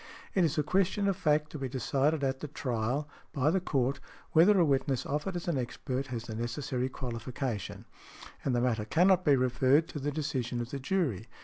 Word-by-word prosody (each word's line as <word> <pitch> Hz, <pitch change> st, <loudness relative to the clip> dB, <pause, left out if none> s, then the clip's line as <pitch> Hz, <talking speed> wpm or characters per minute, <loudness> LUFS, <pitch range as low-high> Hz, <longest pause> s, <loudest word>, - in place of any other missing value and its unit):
It 190 Hz, -, +3 dB
is 160 Hz, -3 st, +1 dB
a 150 Hz, -, +3 dB
question 195 Hz, +5 st, +1 dB
of 195 Hz, -, +2 dB
fact 150 Hz, -4 st, +1 dB
to 150 Hz, -, -6 dB
be 135 Hz, -1 st, -3 dB
decided 140 Hz, +4 st, 0 dB
at 135 Hz, -1 st, 0 dB
the 150 Hz, -, -5 dB
trial, 130 Hz, +1 st, -2 dB, 0.3 s
by 145 Hz, 0 st, +2 dB
the 190 Hz, -, +2 dB
Court, 135 Hz, -5 st, 0 dB, 0.3 s
whether 185 Hz, +5 st, +6 dB
a 170 Hz, -, +5 dB
witness 135 Hz, -2 st, +1 dB
offered 150 Hz, +6 st, -2 dB
as 175 Hz, -, -4 dB
an 160 Hz, -6 st, +1 dB
expert 130 Hz, +2 st, -3 dB
has 120 Hz, -3 st, -4 dB
the 115 Hz, -1 st, -7 dB
necessary 125 Hz, +2 st, -2 dB
qualification. 120 Hz, -3 st, -4 dB, 0.6 s
And 130 Hz, -, +1 dB
the 120 Hz, -, +2 dB
matter 115 Hz, -4 st, 0 dB
cannot 180 Hz, -, +4 dB
be 145 Hz, -4 st, +5 dB
referred 130 Hz, +4 st, +3 dB
to 150 Hz, -, -5 dB
the 145 Hz, +1 st, -1 dB
decision 135 Hz, -5 st, -2 dB
of 120 Hz, 0 st, -4 dB
the 140 Hz, -, -4 dB
jury. 135 Hz, -, -1 dB
135 Hz, 200 wpm, -30 LUFS, 125-155 Hz, 0.6 s, whether